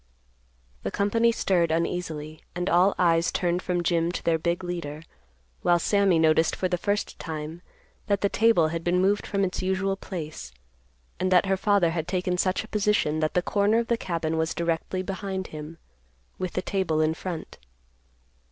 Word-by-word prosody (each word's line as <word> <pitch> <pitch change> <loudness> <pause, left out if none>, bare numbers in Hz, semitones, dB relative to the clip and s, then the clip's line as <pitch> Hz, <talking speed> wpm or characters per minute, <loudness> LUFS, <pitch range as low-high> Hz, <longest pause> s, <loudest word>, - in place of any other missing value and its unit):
The - - -2
company 230 +3 +2
stirred 180 -6 +1
uneasily, 160 -2 -2
and 180 +1 -1
all 180 +4 +4
eyes 170 -1 +3
turned 175 0 0
from 180 -2 -1
Jim 170 0 +1
to - - -4
their 165 -1 +2
big 170 +3 -1
leader, 170 -4 -5 0.6
while 175 0 +4
Sammy 195 0 +3
noticed 160 0 +3
for 185 - 0
the 180 - 0
first 205 +3 -2
time 160 +1 -6 0.5
that 200 -2 +1
the 200 - +3
table 205 -7 +3
had 165 +1 -4
been 175 +1 +2
moved 200 +2 +1
from 200 -1 0
its 185 -1 -1
usual 190 +1 0
place, 155 - -7 0.7
and 185 0 0
that 180 0 +5
her 195 0 +2
father 190 -3 +2
had 165 -1 -3
taken 180 0 -1
such 185 +3 0
a - - -11
position 210 -8 +1
that 155 0 -1
the 180 - +2
corner 205 +3 +2
of 235 -1 -1
the 235 - +3
cabin 165 -6 -2
was 160 0 -1
directly 170 +2 -1
behind 190 0 -4
him, 155 +2 -7 0.6
with 185 -2 -3
the 185 - -2
table 185 -6 0
in 155 0 +2
front. 170 -1 -6
180 Hz, 180 wpm, -26 LUFS, 165-195 Hz, 0.7 s, that